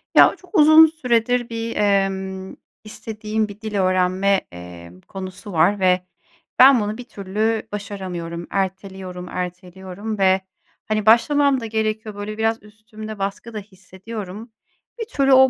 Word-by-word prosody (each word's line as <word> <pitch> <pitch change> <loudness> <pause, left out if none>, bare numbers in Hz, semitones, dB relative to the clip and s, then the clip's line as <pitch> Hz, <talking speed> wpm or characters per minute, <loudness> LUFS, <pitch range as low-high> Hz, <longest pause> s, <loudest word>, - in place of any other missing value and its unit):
Ya, - - +7
çok 370 +2 -14
uzun 310 +1 +9
süredir 245 -6 0
bir, 230 0 -4
emm, 190 -2 0 0.3
istediğim 215 0 -3
bir 205 +1 -12
dil 215 -1 -5
öğrenme, 185 +1 +2
eee, 90 -1 -10 0.2
konusu 195 +1 -8
var 175 +5 +3
ve 185 -1 +2 0.5
ben 260 0 +8
bunu 210 0 -2
bir 250 - -7
türlü 215 0 -2
başaramıyorum. 185 -5 -6
Erteliyorum, 190 -2 -4
erteliyorum 185 +3 -6
ve, 190 0 +4 0.5
hani, 215 -1 -1
başlamam 270 +5 +4
da 230 - -6
gerekiyor. 220 -1 -2
Böyle 205 +1 -6
biraz 225 -1 0
üstümde 215 0 -10
baskı 200 +4 -4
da 215 - -4
hissediyorum. 195 +2 -9 0.5
Bir 455 - -2
türlü 275 - +2
o 265 0 +7
210 Hz, 135 wpm, -21 LUFS, 190-225 Hz, 0.5 s, uzun